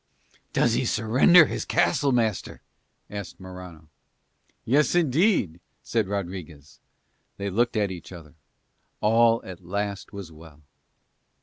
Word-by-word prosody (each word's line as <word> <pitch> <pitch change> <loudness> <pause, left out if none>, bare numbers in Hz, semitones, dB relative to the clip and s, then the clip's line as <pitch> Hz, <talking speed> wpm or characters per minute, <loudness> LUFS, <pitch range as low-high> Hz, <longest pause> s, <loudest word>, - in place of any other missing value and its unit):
"Does - - +2
he - - +1
surrender 130 - +5
his - - -4
castle, 150 -4 +1
master?" 115 -5 -1 0.5
asked 100 -3 -8
Morano. 90 -4 -11 0.8
"Yes, 145 +8 +2
indeed," 160 - +2 0.2
said 110 -4 -1
Rodriguez. 90 -7 -6 0.6
They 100 0 -4
looked 120 +3 +1
at 100 -2 0
each 90 -2 -9
other: 80 -5 -12 0.7
all 115 +1 +3
at 95 -1 -10
last 100 +2 -4
was 100 -5 -8
well. 80 -1 -16
100 Hz, 115 wpm, -25 LUFS, 90-120 Hz, 0.8 s, surrender